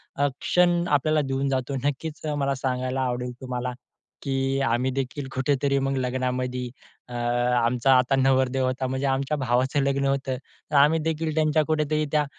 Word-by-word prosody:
अ, 145 - +2
क्षण 175 -1 +3
आपल्याला 150 +2 +2
देऊन 135 +1 -1
जातो. 130 +1 -1
नक्कीच 150 +3 -3
मला 140 0 +1
सांगायला 130 0 -2
आवडेल 125 -1 -2
तुम्हाला, 125 -1 -3 0.5
की 135 -1 -1
आम्ही 125 +3 +1
देखील 135 +1 -3
कुठेतरी 140 +1 +1
मग 135 0 0
लग्नामधी 125 0 -2 0.4
अ, - - -8
आमचा 120 +1 +2
आता 130 +2 +2
नवरदेव 130 0 +2
होता 130 +1 -1
म्हणजे 130 +2 -2
आमच्या 135 +3 0
भावाचं 130 +2 +1
लग्न 140 0 +1
होतं, 135 -1 -1 0.3
तर - - -1
आम्ही 150 +3 +5
देखील 160 0 -2
त्यांच्या 155 -1 +3
कुठेतरी 155 0 0
त्या 150 -1 +2
135 Hz, 155 wpm, -25 LUFS, 125-145 Hz, 0.5 s, आम्ही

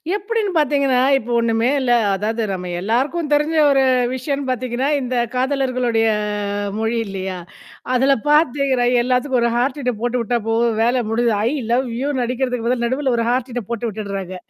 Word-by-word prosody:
எப்படின்னு 420 0 -2
பார்த்தீங்கன்னா, 280 -3 +2 0.2
இப்போ 245 -2 -6
ஒண்ணுமே 230 +1 +1
இல்ல. 255 -2 0 0.2
அதாவது 220 +4 -2
நம்ம 180 -1 -4
எல்லாருக்கும் 275 - -1
தெரிஞ்ச 300 +2 +1
ஒரு 270 -1 +3 0.3
விஷயம்ன்னனு 275 +1 -3
பாத்தீங்கன்னா, 255 +2 -2
இந்த 255 0 -3 0.2
காதலர்களுடைய 255 -3 0 0.7
மொழி 225 +1 -1
இல்லையா? 190 -1 -5 0.6
அதில 270 +2 +4
பாத்தீங்கன்னா 275 -4 +2 0.2
எல்லாத்துக்கும் 255 0 +1
ஒரு 235 0 +2
ஹார்ட்டின் 250 -2 -1
போட்டு 245 +1 0
உட்டா 235 +2 0
போது 230 +1 +2 0.2
வேல 245 +1 +1
முடிஞ்சது. 230 0 +1
"ஐய் 285 +5 0
லவ் 255 +2 +1
யு" 280 - -1
னு 245 - 0
அடிக்கிறதுக்கு 250 -1 -2
பதில 240 -1 0
நடுவுல 260 +2 0
ஒரு 230 - 0
ஹார்ட்டின் 245 -3 -3
போட்டு 235 0 -2
விட்டுடுறாங்க. 195 -3 -5
250 Hz, 155 wpm, -19 LUFS, 230-270 Hz, 0.7 s, அதில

